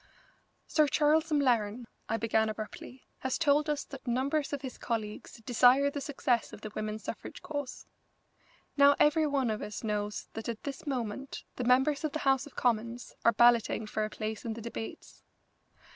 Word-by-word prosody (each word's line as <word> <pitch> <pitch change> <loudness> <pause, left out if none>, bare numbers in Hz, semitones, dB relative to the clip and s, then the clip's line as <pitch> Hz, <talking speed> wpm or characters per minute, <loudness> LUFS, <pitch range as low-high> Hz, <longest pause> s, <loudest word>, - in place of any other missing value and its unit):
"Sir 305 -2 +3
Charles 310 +3 +3
M'Laren," 240 -5 +2 0.2
I 225 - +1
began 220 0 +1
abruptly, 215 +4 -7 0.2
"has 260 0 -1
told 300 -1 +3
us 295 -1 0
that 275 -2 -11
numbers 275 +5 0
of 285 -2 -4
his 260 - -7
colleagues 215 -3 -4
desire 255 +4 +5
the 285 - -4
success 255 -4 0
of - - -10
the 215 - -6
women's 215 0 -4
suffrage - - -7
cause. 285 -4 -5 0.9
Now 280 0 +7
every 300 +1 +4
one 270 -5 +1
of 215 - -3
us 210 - -6
knows 210 -1 -2
that 225 +1 -5
at 230 -2 -5
this 280 +2 -6
moment 260 0 -4
the 250 - -2
members 265 +5 +3
of 310 - -1
the - - 0
House 270 +1 +3
of 290 - -16
Commons 235 0 -1
are 230 - +6
balloting 235 -1 +4
for 215 0 -2
a 215 - -2
place 215 0 -5
in 230 - -3
the 230 - -8
debates. 235 +6 -7
250 Hz, 175 wpm, -30 LUFS, 220-280 Hz, 0.9 s, Now